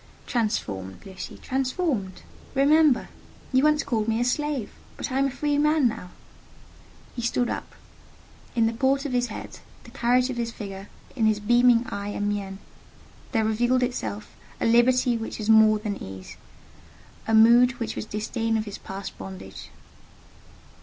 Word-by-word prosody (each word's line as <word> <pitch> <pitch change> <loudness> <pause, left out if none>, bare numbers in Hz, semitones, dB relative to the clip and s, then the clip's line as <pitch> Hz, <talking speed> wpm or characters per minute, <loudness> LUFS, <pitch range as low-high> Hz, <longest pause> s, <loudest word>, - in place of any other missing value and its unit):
"Transformed, 100 - -2
Lucy: 190 -1 -8
transformed! 260 - -2 0.3
Remember, 290 0 +4 0.4
you 260 +1 +4
once 300 0 +3
called 220 -4 -1
me 225 0 +1
a 240 - +1
slave! 280 -2 -1 0.3
but - - -4
I 265 - 0
am 275 - +3
a - - -2
free 290 +2 -1
man 300 -2 +3
now!" 200 -6 -5 1.1
He 240 - -4
stood 240 +1 0
up: - - -6 0.8
in 230 -1 +3
the 225 - +1
port 270 +4 +1
of 285 - -3
his 245 0 +1
head, 215 - -8 0.2
the - - -14
carriage 250 +2 +2
of 245 - -6
his 230 -1 -2
figure, 195 -2 -8 0.3
in 225 -4 +2
his 215 -1 +2
beaming 240 +2 +4
eye 200 -3 -5
and 205 0 -2
mien, 200 -2 -3 0.7
there 225 -3 +1
revealed 240 +4 +2
itself 110 - -4 0.2
a - - -1
liberty 240 +1 +4
which 225 - -5
was 215 0 +1
more 220 -1 +6
than 210 -1 -5
ease—a 95 - -8
mood 235 +3 +6
which 230 -3 -5
was - - -4
disdain 225 +2 -1
of 215 - -2
his 205 - -7
past 195 +1 -7
bondage. 95 0 -9
230 Hz, 160 wpm, -25 LUFS, 205-255 Hz, 1.1 s, more